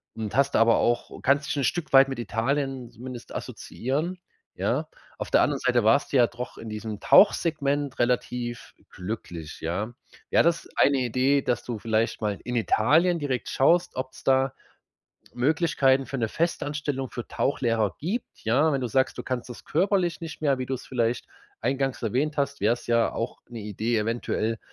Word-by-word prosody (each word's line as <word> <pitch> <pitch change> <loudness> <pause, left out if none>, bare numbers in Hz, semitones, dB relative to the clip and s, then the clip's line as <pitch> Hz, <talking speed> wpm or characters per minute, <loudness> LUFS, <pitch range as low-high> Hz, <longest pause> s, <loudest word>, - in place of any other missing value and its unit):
und 110 -2 -4
hast 140 +1 +2
aber 115 0 +5
auch 120 0 -1
kannst 140 +1 +2
dich - - -2
'n 140 - 0
Stück 170 +3 -1
weit 135 0 +8
mit 135 - -4
Italien 130 +3 -1
zumindest 125 +1 -9
assoziieren, 150 +9 -3 0.4
ja? - - -1 0.3
Auf - - -5
der - - +5
anderen - - +1
Seite 120 -1 +2
warst 115 +8 +3
du - - +5
ja 120 -2 +6
doch 120 +1 -7
in 115 - -8
diesem 105 -1 -6
Tauchsegment 145 -7 +3
relativ 120 -1 -1
glücklich, 90 -5 -7
ja? 95 +8 -3 0.4
Wäre - - +4
das 170 0 +1
ist - - -17
eine 140 -1 +4
Idee, 130 +3 +2
dass 125 -3 -1
du 120 -3 -4
vielleicht 110 +1 0
mal 105 -2 -1
in 125 - -3
Italien 160 +10 +3
direkt 135 -4 -2
schaust, 170 +6 +3
ob's 130 0 -5
da 135 0 +3 0.8
Möglichkeiten 135 -1 +2
für 135 - -5
'ne 115 -3 0
Festanstellung 145 -4 -2
für 120 - -7
Tauchlehrer 115 -8 0
gibt, 200 - -4
ja? 140 +8 +3
Wenn 135 - 0
du 125 - -1
sagst, 130 +3 +1
du - - -5
kannst 130 -1 -4
das 120 - -10
körperlich 180 0 +1
nicht 165 -2 -7
mehr, 140 -3 +2
wie 130 - -2
du's 130 -2 -4
vielleicht 120 -2 -1 0.3
eingangs 135 +1 -1
erwähnt 135 +8 0
hast, 140 0 -1
wär's 120 +4 +1
ja 115 -1 +2
auch 115 - -4
'ne 120 -2 -7
Idee, 110 +3 -1
eventuell 115 0 -1
130 Hz, 175 wpm, -26 LUFS, 115-140 Hz, 0.8 s, weit